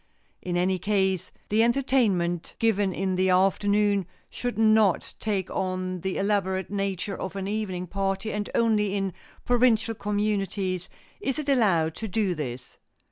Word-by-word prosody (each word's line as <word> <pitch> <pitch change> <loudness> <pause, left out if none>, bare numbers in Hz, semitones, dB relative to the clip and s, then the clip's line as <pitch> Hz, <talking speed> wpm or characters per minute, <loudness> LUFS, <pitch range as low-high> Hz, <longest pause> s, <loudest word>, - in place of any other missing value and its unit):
In 175 -1 -2
any 185 +1 +1
case 190 -2 0 0.2
the 215 +2 +3
entertainment 230 -9 +1
given 205 -4 +2
in 190 +1 -1
the 185 +1 +2
afternoon 200 +1 +2 0.2
should 245 -3 -4
not 220 -4 +3
take 200 -4 -1
on 185 -1 -2
the 190 +1 -2
elaborate 190 -2 0
nature 195 -1 -2
of 190 +1 -5
an 195 -1 -3
evening 200 -4 -2
party 195 +3 -2
and 210 -1 -3
only 210 -3 +2
in 195 -2 -1 0.3
provincial 240 -2 +3
communities 200 -3 -1 0.3
is 270 -10 -2
it 300 -2 -3
allowed 185 - +3
to 220 - -4
do 200 -2 0
this. 130 -6 -6
195 Hz, 140 wpm, -26 LUFS, 185-215 Hz, 0.3 s, the